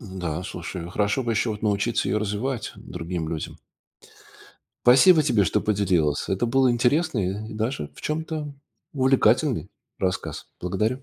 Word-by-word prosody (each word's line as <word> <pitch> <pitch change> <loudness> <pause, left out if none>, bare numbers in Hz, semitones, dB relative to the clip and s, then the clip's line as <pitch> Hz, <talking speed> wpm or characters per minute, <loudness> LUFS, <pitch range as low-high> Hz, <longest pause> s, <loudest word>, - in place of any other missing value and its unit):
Н-да, 90 - -5
слушай, 85 0 -6
хорошо 105 +7 0
бы 115 - 0
ещё 110 +1 0
вот 105 0 -6
научиться 105 +2 +1
её 105 - +1
развивать 110 +4 -2
другим 85 -1 -5
людям. 80 -1 -5 1.3
Спасибо 145 +8 +7
тебе, 115 -8 +3
что 90 - +1
поделилась, 90 -8 +1
это 95 +5 0
был 130 +2 +3
интересный, 120 - 0
и - - -7
даже, 115 +5 -3
в - - -11
чем-то, 155 -1 -3 0.4
увлекательный 130 - +2 0.3
рассказ. 95 -1 -3
Благодарю. 110 +8 -1
110 Hz, 135 wpm, -24 LUFS, 95-130 Hz, 1.3 s, Спасибо